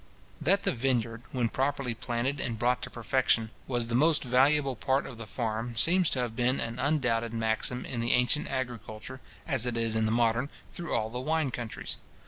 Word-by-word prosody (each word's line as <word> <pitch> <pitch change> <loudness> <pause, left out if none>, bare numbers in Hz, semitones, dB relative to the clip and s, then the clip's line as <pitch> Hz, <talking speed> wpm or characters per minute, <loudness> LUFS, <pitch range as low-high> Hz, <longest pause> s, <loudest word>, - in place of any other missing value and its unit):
That 195 +5 +3
the - - +2
vineyard, 120 -2 0
when 120 -3 0
properly 135 -1 -1
planted 120 +5 -2
and 115 -2 -2
brought 125 +2 +1
to - - -5
perfection, 115 -2 +1 0.2
was 120 -3 0
the 115 - -5
most 150 +5 +4
valuable 135 +2 +3
part 135 +4 +1
of 125 -4 -9
the 115 - -7
farm, 115 +1 -3
seems 175 - +5
to 130 - 0
have 120 -2 -3
been 125 +2 +2
an 115 +2 -3
undoubted 120 -6 +1
maxim 110 +2 0
in 120 - -4
the 115 +1 +2
ancient 125 +4 +3
agriculture, 125 -1 -5 0.2
as 125 -3 -1
it 120 -1 -1
is 115 -1 +1
in 110 0 +2
the - - 0
modern, 115 +3 +2 0.2
through 170 -1 -6
all 110 -1 -1
the 125 - -3
wine 155 +1 0
countries. 120 -2 -4
125 Hz, 195 wpm, -29 LUFS, 115-135 Hz, 0.2 s, seems